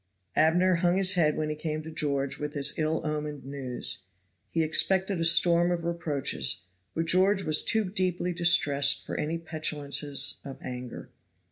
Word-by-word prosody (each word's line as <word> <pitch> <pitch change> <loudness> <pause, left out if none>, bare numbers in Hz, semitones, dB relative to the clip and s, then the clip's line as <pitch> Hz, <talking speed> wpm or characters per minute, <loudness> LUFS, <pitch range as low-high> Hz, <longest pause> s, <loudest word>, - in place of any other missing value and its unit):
Abner 175 +3 +3
hung 175 +1 +1
his 190 -1 +4
head 155 -4 +1
when 155 -1 -2
he 155 - -3
came 155 0 -5
to 160 - -9
George 140 -3 -2
with 150 0 -5
this 140 -1 +1
ill 155 +1 -1
omened 150 -2 -5
news. 135 -6 -4 0.5
He 165 - -1
expected 190 +3 +2
a - - +1
storm 170 +1 +4
of 175 -1 -2
reproaches. 170 - -2 0.3
But 165 - -1
George 190 +3 +2
was 155 -1 +3
too 220 -3 0
deeply 180 -2 -2
distressed 145 -5 +3
for - - -6
any 160 +2 -3
petulances 150 -3 0
of 135 -1 -9
anger. 125 -1 -8
160 Hz, 160 wpm, -27 LUFS, 145-175 Hz, 0.5 s, his